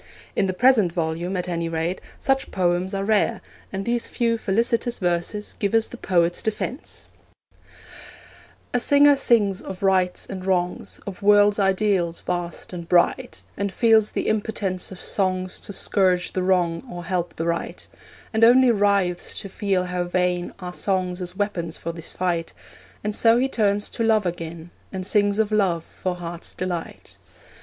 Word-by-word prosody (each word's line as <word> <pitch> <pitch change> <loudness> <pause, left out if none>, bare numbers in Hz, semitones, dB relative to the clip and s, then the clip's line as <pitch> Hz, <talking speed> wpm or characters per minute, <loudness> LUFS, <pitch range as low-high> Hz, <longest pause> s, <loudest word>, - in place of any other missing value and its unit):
In 195 - +2
the 185 - -1
present 220 -3 +4
volume, 170 +2 -2
at 180 - -3
any 170 -1 -2
rate, 165 +3 -2 0.2
such 270 0 0
poems 180 +1 0
are 195 - -1
rare, 215 0 +2 0.3
and 195 0 -4
these 235 0 0
few 230 -1 0
felicitous 230 +3 0
verses 180 +3 -2
give 200 +1 0
us 225 0 +3
the - - -9
poet's 175 -6 +1
defence: 220 +5 -4 1.7
A 245 - +2
singer 285 +3 +6
sings 215 -8 +2
of 190 +1 -8
rights 185 -2 +2
and 190 -2 -7
wrongs, 180 -2 -1
Of 200 -1 -7
world's 205 0 +5
ideals 195 -3 +1
vast 175 0 -4
and 170 -1 -7
bright, 205 +8 +2
And 200 -1 -2
feels 220 0 +4
the - - -2
impotence 205 -4 -2
of 185 - -9
songs 185 -2 -1
To - - -7
scourge 185 -2 +1
the 185 - -1
wrong 175 -3 +1
or 175 0 -6
help 175 -2 -2
the 165 - -3
right; 170 0 -3 0.5
And 220 +1 +2
only 250 +2 +7
writhes 200 -4 +1
to 195 - -8
feel 195 -2 0
how 180 0 -2
vain 180 0 0
Are 180 -1 -7
songs 185 -1 -1
as 180 +1 -5
weapons 180 -6 -2
for 170 - -5
his 165 -1 -6
fight; 175 -2 -2 0.5
And 210 0 -1
so 230 +1 +5
he 260 +2 +2
turns 205 -5 +1
to 230 - -2
love 220 -2 +3
again, 170 -1 -5 0.2
And 185 -1 -4
sings 205 0 +2
of 220 -1 +1
love 190 -6 +1
for 185 +1 -4
heart's 170 -1 -6
delight. 180 -2 -5
190 Hz, 165 wpm, -23 LUFS, 175-210 Hz, 1.7 s, only